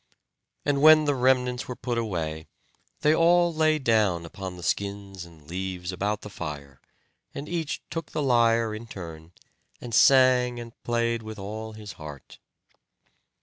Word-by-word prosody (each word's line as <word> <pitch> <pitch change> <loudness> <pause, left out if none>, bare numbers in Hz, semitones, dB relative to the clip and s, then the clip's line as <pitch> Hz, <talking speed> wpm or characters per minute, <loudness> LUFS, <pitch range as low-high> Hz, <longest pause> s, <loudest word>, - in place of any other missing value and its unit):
And 140 -1 +1
when 155 0 +8
the 145 - +2
remnants 125 -1 +1
were 125 - -5
put 120 -1 -2
away, 80 -8 -3 0.5
they 150 - +4
all 175 +1 +4
lay 155 0 +3
down 110 - +1
upon 95 +2 -7
the 90 - -10
skins 100 -1 -3
and 80 -3 -17
leaves 90 +1 -4
about 100 +3 -2
the 105 - -9
fire, 70 -7 -7 0.5
and 145 - -6
each 165 -3 -3
took 165 0 -4
the 150 - -2
lyre 115 -3 +3
in 110 +2 -7
turn, 80 -5 -9 0.5
and 120 -2 -8
sang 125 -1 +5
and 115 -1 -9
played 115 -1 0
with 110 0 -8
all 110 +3 -6
his 105 -2 -9
heart. 75 -3 -10
110 Hz, 150 wpm, -26 LUFS, 90-130 Hz, 0.5 s, when